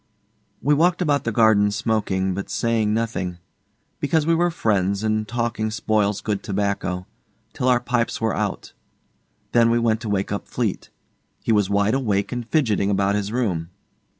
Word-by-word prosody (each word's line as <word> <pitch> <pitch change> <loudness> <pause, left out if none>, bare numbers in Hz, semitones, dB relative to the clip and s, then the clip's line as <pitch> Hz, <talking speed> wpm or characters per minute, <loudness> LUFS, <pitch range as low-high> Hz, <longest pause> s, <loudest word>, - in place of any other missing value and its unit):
We 150 - +4
walked 175 +4 +3
about 145 -3 +1
the 115 - 0
garden 105 -2 +4
smoking, 100 -3 0
but 100 +2 -5
saying 115 -2 0
nothing 110 -6 -2 0.6
because 155 +1 +1
we 165 - +3
were 175 +1 +2
friends, 100 - 0
and 110 0 0
talking 115 -1 -1
spoils 105 -1 0
good 105 -2 -2
tobacco 100 -2 -2 0.5
till 125 - -2
our 125 -1 +4
pipes 120 -1 -1
were 110 -3 0
out. - - -3 0.8
Then 115 -1 +4
we 115 - +3
went 115 -1 +1
to 110 - -4
wake 100 -1 -1
up 100 - -3
Fleete. 115 -6 -3 0.5
He - - 0
was 105 -3 +3
wide 100 +2 +2
awake 105 -7 0
and 120 -2 -5
fidgeting 110 -10 +1
about 100 0 +1
his 105 0 -2
room. 95 -10 -1
110 Hz, 165 wpm, -22 LUFS, 100-120 Hz, 0.8 s, We